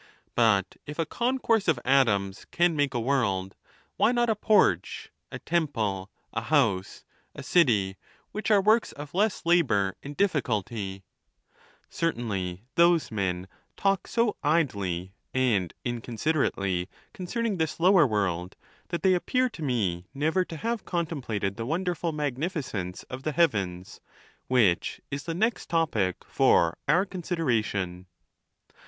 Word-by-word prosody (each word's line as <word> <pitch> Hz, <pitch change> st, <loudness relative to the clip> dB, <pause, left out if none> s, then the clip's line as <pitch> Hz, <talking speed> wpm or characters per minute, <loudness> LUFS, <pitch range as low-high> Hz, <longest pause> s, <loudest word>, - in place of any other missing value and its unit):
But 110 Hz, -5 st, +2 dB
if 150 Hz, -, -7 dB
a 165 Hz, -, 0 dB
concourse 235 Hz, -, 0 dB
of 155 Hz, -7 st, +3 dB
atoms 105 Hz, -7 st, +2 dB
can 175 Hz, -1 st, +2 dB
make 145 Hz, -3 st, 0 dB
a -, -, +1 dB
world, 115 Hz, -7 st, 0 dB, 0.4 s
why 230 Hz, -, +4 dB
not 240 Hz, -2 st, +2 dB
a -, -, +1 dB
porch, 195 Hz, -, +2 dB, 0.2 s
a -, -, -5 dB
temple, 110 Hz, -, -1 dB, 0.2 s
a 115 Hz, -, -1 dB
house, 115 Hz, -8 st, +1 dB, 0.3 s
a -, -, -7 dB
city, 105 Hz, -, +3 dB, 0.3 s
which 215 Hz, 0 st, -3 dB
are 210 Hz, -2 st, +6 dB
works 220 Hz, +3 st, +3 dB
of 145 Hz, 0 st, -9 dB
less 200 Hz, 0 st, 0 dB
labor 125 Hz, -, +3 dB
and 145 Hz, +1 st, -9 dB
difficulty? 110 Hz, -, -1 dB, 0.8 s
Certainly 100 Hz, -, -2 dB
those 170 Hz, -3 st, +4 dB
men 95 Hz, -3 st, -2 dB, 0.3 s
talk 195 Hz, -1 st, +1 dB
so 230 Hz, -3 st, +1 dB
idly 100 Hz, -, 0 dB, 0.2 s
and 110 Hz, -10 st, +2 dB
inconsiderately 115 Hz, -, -1 dB, 0.2 s
concerning 225 Hz, +1 st, -2 dB
this 160 Hz, -1 st, -2 dB
lower 180 Hz, -3 st, +6 dB
world 95 Hz, -5 st, -1 dB, 0.3 s
that 170 Hz, -, -4 dB
they 190 Hz, -1 st, +5 dB
appear 255 Hz, +8 st, +1 dB
to 200 Hz, -, -11 dB
me 100 Hz, -, -1 dB
never 160 Hz, +6 st, +1 dB
to 165 Hz, -, -8 dB
have 230 Hz, +4 st, -2 dB
contemplated 130 Hz, -, -2 dB
the 115 Hz, -, -3 dB
wonderful 175 Hz, +1 st, -1 dB
magnificence 140 Hz, -, -3 dB
of 130 Hz, +1 st, -8 dB
the 155 Hz, +2 st, -2 dB
heavens; 100 Hz, -, 0 dB, 0.5 s
which 110 Hz, -9 st, +2 dB
is 140 Hz, 0 st, -4 dB
the 165 Hz, -, -3 dB
next 220 Hz, +6 st, 0 dB
topic 115 Hz, -, 0 dB
for 85 Hz, -1 st, +3 dB
our 175 Hz, +6 st, +4 dB
consideration. 115 Hz, -, -2 dB
135 Hz, 130 wpm, -27 LUFS, -, 0.8 s, are